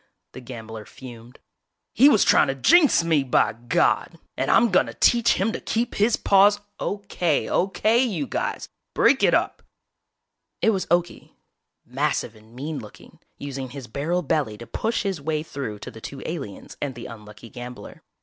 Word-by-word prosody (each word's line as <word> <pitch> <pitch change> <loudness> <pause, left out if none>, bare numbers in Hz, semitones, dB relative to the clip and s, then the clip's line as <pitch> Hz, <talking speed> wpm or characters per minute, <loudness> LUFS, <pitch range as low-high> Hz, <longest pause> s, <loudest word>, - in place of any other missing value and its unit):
The 130 - -10
gambler 115 -3 -9
fumed. 120 0 -13 0.6
"He 270 +6 +6
was 220 -8 +4
trying - - +4
to 135 - -1
jinx 300 - +5
me, 160 -3 +2
by 130 -4 +2
God! 120 +2 0 0.2
And - - -2
I'm 235 -2 +4
gonna 185 - +2
teach 235 -1 +4
him 195 +4 0
to - - -5
keep 230 +1 -2
his 215 +3 +2
paws 205 +1 +4
" - - -51
"Okay, 195 -6 -1
okay, 215 +5 +2
you 185 - -2
guys, 120 - -3 0.3
break - - +4
it - - +4
up!!" - - -1 1.0
It 225 - +3
was 195 -3 -2
Okie, 175 +1 -1 0.5
massive 135 -2 -2
and 110 +2 -19
mean 145 +3 -5
looking, 105 -4 -14 0.2
using 135 -2 -6
his 135 0 -8
barrel 155 +10 -2
belly 140 -8 -1
to 120 - -10
push 225 - -2
his 195 -6 -3
way 155 +1 -2
through 135 -9 -6
to - - -9
the 110 - -13
two 135 +3 -8
aliens 135 - -7
and 140 -3 -3
the 120 - -9
unlucky 105 0 -11
gambler. 125 0 -10
145 Hz, 170 wpm, -23 LUFS, 120-195 Hz, 1.0 s, He